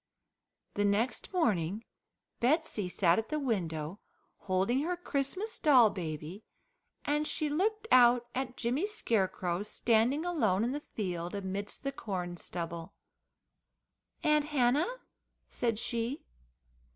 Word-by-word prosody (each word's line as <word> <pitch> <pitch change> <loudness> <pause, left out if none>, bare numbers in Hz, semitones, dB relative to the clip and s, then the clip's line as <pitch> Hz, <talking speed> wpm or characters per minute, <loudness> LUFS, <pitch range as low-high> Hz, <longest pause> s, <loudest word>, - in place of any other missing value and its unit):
The 205 - 0
next 215 +4 0
morning 210 - 0 0.5
Betsey 240 - +1
sat 175 0 +3
at 225 - -5
the 305 - -1
window 180 - -2 0.4
holding 190 +7 +1
her 350 +4 -1
Christmas 355 - -3
doll 255 -8 +6
baby, 165 +2 -6 0.6
and 295 +1 +1
she 305 - 0
looked 425 +8 0
out 245 -1 +6
at 255 -1 -3
Jimmy 255 - 0
Scarecrow 190 - 0
standing 230 +8 +1
alone 220 - +2
in 240 - 0
the 290 - -2 0.2
field 180 -3 -3
amidst 200 +1 -4
the 275 - -1
corn 185 -8 -4
stubble. 170 -1 -6 1.3
"Aunt 300 -1 +3
Hannah?" 290 - +2 0.6
said 230 -3 0
she. 235 +4 -2
230 Hz, 115 wpm, -31 LUFS, 190-290 Hz, 1.3 s, doll